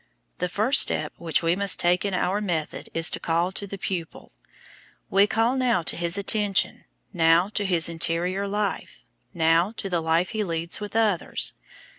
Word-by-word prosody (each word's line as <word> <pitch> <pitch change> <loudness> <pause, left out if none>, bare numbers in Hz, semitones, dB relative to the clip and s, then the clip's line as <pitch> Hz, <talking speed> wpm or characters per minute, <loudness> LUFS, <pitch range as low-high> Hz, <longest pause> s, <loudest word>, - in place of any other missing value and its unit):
The 180 - -2
first 220 +9 +4
step - - 0
which 165 0 +1
we 165 +1 +2
must 200 -3 +3
take 175 +1 +2
in 200 -2 -2
our 190 +3 -1
method 170 -7 -4
is 165 0 0
to - - -2
call 170 +2 -1
to 200 +1 -3
the 200 - -7
pupil. 175 -4 -6 0.8
We 200 +1 +4
call 225 +4 +1
now 245 -9 +1
to - - +3
his 170 +2 -1
attention, 200 -1 +1 0.3
now 165 +2 +3
to 210 -1 -2
his 175 -4 +2
interior 170 +4 -1
life, 205 0 -4 0.3
now 165 +3 +2
to 195 - -5
the 170 -2 0
life 165 +2 0
he 220 -2 -2
leads 170 -2 -3
with 210 +1 -8
others. 215 -6 0
180 Hz, 175 wpm, -24 LUFS, 170-205 Hz, 0.8 s, first